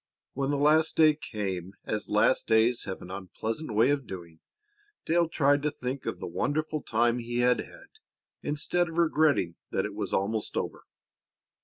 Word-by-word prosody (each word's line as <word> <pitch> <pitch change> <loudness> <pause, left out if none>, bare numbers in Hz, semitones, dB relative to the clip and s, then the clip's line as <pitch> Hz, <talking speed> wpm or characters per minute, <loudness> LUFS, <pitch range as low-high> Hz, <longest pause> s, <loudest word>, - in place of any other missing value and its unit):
When 135 +1 -1
the 145 - +1
last 155 +3 +3
day 155 -1 +6
came, 95 - -4
as 105 -1 -3
last 105 +5 +3
days 115 +2 +3
have 95 -2 -6
an 90 - -9
unpleasant 110 - -5
way 115 +6 +5
of 140 -3 -1
doing, 85 -4 -9 0.7
Dale 170 0 +2
tried 145 -3 +3
to 150 - +1
think 130 -2 -5
of - - -2
the - - -6
wonderful 155 +1 -1
time 120 +1 +1
he 120 +1 -2
had 125 0 +3
had - - -11 0.4
instead 165 +4 0
of 160 - -8
regretting 155 - +2
that - - -1
it - - -5
was - - -4
almost 105 +2 -1
over. - - -4
125 Hz, 170 wpm, -28 LUFS, 105-155 Hz, 0.7 s, day